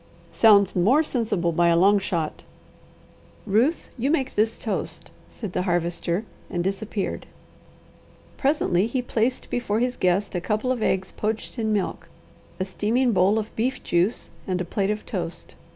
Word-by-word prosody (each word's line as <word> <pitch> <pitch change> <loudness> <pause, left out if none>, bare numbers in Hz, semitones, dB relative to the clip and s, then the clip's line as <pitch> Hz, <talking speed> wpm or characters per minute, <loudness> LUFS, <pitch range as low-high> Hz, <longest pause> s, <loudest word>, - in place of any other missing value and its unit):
"Sounds 200 -4 +5
more 230 - +4
sensible 215 - 0
by 170 +1 +3
a 170 0 +4
long 200 +3 +5
shot." 170 -5 -3 1.0
"Ruth, 230 - +1
you 260 +4 +1
make 275 -4 0
this 220 +2 +1
toast," 220 - -4 0.2
said 210 -6 -7
the - - 0
Harvester 175 +2 -1 0.2
and 175 -1 -2
disappeared. 195 +1 -3 1.1
Presently 245 - +1
he 250 +2 -2
placed 240 +2 -1
before 225 -3 0
his 250 +1 0
guest 185 +3 +1
a 180 - -1
couple 215 +6 0
of 250 -3 -1
eggs 190 -2 0
poached 220 +3 -3
in 220 -1 0
milk, 205 -3 -2 0.5
a 185 - 0
steaming 230 +6 +1
bowl 195 +1 +3
of 220 0 -4
beef 250 +4 -1
juice, 175 +6 0 0.2
and 185 -1 -1
a 180 - -2
plate 195 +3 -1
of 210 0 -2
toast. 175 -6 -5
210 Hz, 155 wpm, -24 LUFS, 180-230 Hz, 1.1 s, Sounds